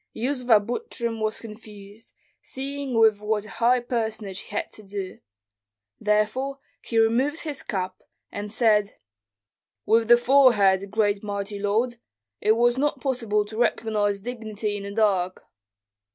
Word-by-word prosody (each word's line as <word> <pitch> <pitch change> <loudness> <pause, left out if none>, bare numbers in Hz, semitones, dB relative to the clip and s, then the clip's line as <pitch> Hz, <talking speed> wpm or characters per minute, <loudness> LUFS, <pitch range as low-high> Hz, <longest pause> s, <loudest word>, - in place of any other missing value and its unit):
Yuzva 245 -2 +3
Butrym 235 - -4
was 215 0 -1
confused, 210 -1 -12 0.3
seeing 275 -1 -5
with 220 -2 +5
what 210 0 -1
a - - -11
high 245 +2 +3
personage 220 -5 -3
he - - -11
had - - -3
to - - -10
do; 195 -2 -6 0.8
therefore 215 +6 0 0.2
he 230 - -3
removed 250 +8 +2
his 295 -4 -5
cap, 185 -2 -4 0.3
and 205 0 -5
said, 215 -3 +2 0.9
"With 225 0 +3
the 240 +1 +8
forehead, 225 -7 +4
great 205 -1 +1
mighty 200 0 -4
lord. 225 +4 0 0.4
It 215 - +3
was 240 +2 +2
not 295 +1 0
possible 230 -6 0
to 215 +1 -9
recognize 210 -4 0
dignity 220 -2 -4
in 205 - -5
the 200 0 -6
dark." 195 -4 +1
220 Hz, 140 wpm, -25 LUFS, 205-240 Hz, 0.9 s, the